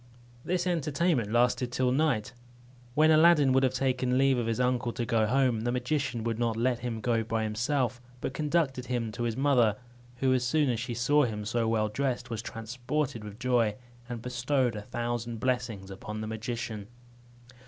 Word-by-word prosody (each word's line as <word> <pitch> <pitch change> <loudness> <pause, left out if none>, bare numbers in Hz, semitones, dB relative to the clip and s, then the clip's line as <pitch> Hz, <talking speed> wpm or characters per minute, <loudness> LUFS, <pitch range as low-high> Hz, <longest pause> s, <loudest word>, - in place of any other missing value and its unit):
This 180 0 -1
entertainment 155 - 0
lasted 120 +1 +2
till 125 0 +1
night, 130 -6 +1 0.6
when 155 +2 +5
Aladdin 155 -4 +6
would 130 - +4
have 130 -1 +1
taken 130 -1 +1
leave 135 -1 +3
of 115 - -2
his 115 +1 -1
uncle 125 -1 +1
to 120 - -2
go 110 -1 +2
home; 125 -2 +2
the 120 +2 0
magician 125 -1 -1
would 115 0 -2
not 115 -2 0
let 120 +1 +1
him 115 -2 -4
go 115 0 +1
by 110 0 -1
himself, 120 +3 -1 0.2
but 130 - -4
conducted 145 -4 0
him 120 -3 -2
to 115 - -7
his 115 -1 -1
mother, 125 -6 +3 0.4
who, 130 +1 +2
as 125 -1 +1
soon 140 +2 +2
as 115 - -2
she 120 0 -4
saw 145 +6 +3
him 105 -3 -4
so 115 +1 0
well 110 -1 +1
dressed, 125 +2 -2
was 110 -1 -3
transported 120 +2 -3
with 105 -1 -9
joy, 120 -4 +1 0.3
and 120 -2 -5
bestowed 125 0 0
a 105 - -4
thousand 120 0 -3
blessings 120 -6 -2
upon 105 +2 -6
the 110 - -4
magician. 110 -1 -4
120 Hz, 185 wpm, -29 LUFS, 115-130 Hz, 0.6 s, Aladdin